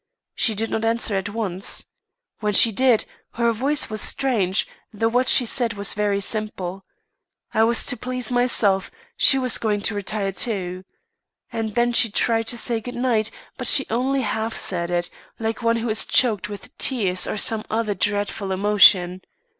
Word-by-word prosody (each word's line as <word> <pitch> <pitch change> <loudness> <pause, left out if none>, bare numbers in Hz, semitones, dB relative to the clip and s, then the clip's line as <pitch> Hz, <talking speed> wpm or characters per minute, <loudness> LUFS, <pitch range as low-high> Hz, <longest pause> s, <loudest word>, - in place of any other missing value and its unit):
She 220 - +1
did 225 +2 -2
not 220 - -3
answer 225 -1 -1
at 195 +1 -3
once. 200 -3 -3 0.5
When 210 -1 -2
she 225 +3 +6
did, 245 +1 +1 0.3
her 235 0 0
voice 275 +7 0
was 215 -1 +3
strange, 215 -8 +2 0.3
though 225 +1 -2
what 250 +2 0
she 250 - +7
said 235 0 -1
was 200 -1 0
very 205 -1 -1
simple. 195 -3 -5 0.7
I 220 - +2
was 235 0 +1
to - - +2
please 250 0 -5
myself; 235 -6 0 0.3
she 270 - +6
was 255 -2 +2
going 210 -2 -2
to 220 - +1
retire, 205 0 -2
too. 185 -2 -2 0.7
And 220 -2 -5
then 240 0 0
she 230 -1 +6
tried 225 +2 0
to 240 - -1
say 235 -1 -1
good 245 +2 -9
night, 240 -3 0 0.3
but - - 0
she 270 - +6
only 265 +4 -1
half 220 -1 -3
said 170 -2 0
it, 175 0 -2 0.3
like 225 0 -5
one 230 0 0
who 230 0 -4
is 215 - +2
choked 210 -6 +2
with 205 -1 -11
tears 195 -9 +1
or - - -4
some 215 +1 0
other 220 -1 -2
dreadful 205 0 -3
emotion. 185 -2 +3
220 Hz, 175 wpm, -21 LUFS, 200-235 Hz, 0.7 s, she